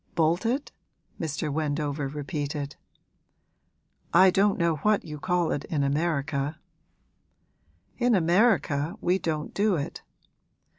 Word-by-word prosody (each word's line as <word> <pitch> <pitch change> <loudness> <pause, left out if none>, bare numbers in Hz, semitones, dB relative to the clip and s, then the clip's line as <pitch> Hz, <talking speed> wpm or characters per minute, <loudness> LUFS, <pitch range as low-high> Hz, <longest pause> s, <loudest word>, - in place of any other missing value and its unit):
'Bolted?' 185 - +1 0.5
Mr. 150 -1 -2
Wendover 145 -1 -1
repeated. 145 0 -4 1.4
'I 185 +1 +7
don't 195 +2 +3
know 170 -2 +1
what 210 +7 +1
you 150 -2 -7
call 175 0 +1
it 145 - -2
in 145 -3 -1
America.' 145 0 -1 1.4
'In 245 -2 +3
America 170 - +2
we 180 +2 +1
don't 155 -3 -3
do 205 -1 +2
it.' 145 -3 -4
160 Hz, 105 wpm, -27 LUFS, 145-185 Hz, 1.4 s, I